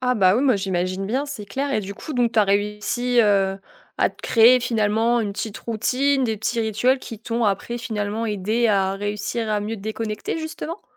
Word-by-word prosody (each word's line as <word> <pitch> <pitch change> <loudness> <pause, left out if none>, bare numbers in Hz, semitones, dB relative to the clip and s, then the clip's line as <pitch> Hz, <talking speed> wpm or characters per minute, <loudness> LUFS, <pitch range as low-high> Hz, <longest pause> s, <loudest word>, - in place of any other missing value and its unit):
Ah 250 0 +1
bah, 190 -4 +4
oui, 255 - +1
moi 260 -6 +4
j'imagine 185 0 -2
bien, 260 +7 -1
c'est 275 -7 -6
clair 275 +8 -2
et 215 - +1
du 200 0 -7
coup, 310 - -8
donc 245 -3 +1
tu 230 - +1
as 210 - +6
réussi, 210 +5 +1
heu, 195 -3 +2 0.4
à - - +3
te - - -20
créer, 235 +2 +6
finalement, 230 0 +1
une 205 -3 -2
petite 210 +1 -5
routine, 260 +4 0
des 225 -2 -1
petits 230 +3 -1
rituels 225 +4 +1
qui 225 -4 -9
t'ont 230 +1 -1
après 215 +4 -1
finalement 220 -2 -3
aidé 215 +3 0
à 195 -2 +2
réussir 205 +3 -3
à 210 -1 0
mieux 220 +2 -4
te - - -11
déconnecter, 215 +5 -4
justement? 320 +3 -6
220 Hz, 210 wpm, -22 LUFS, 205-245 Hz, 0.4 s, as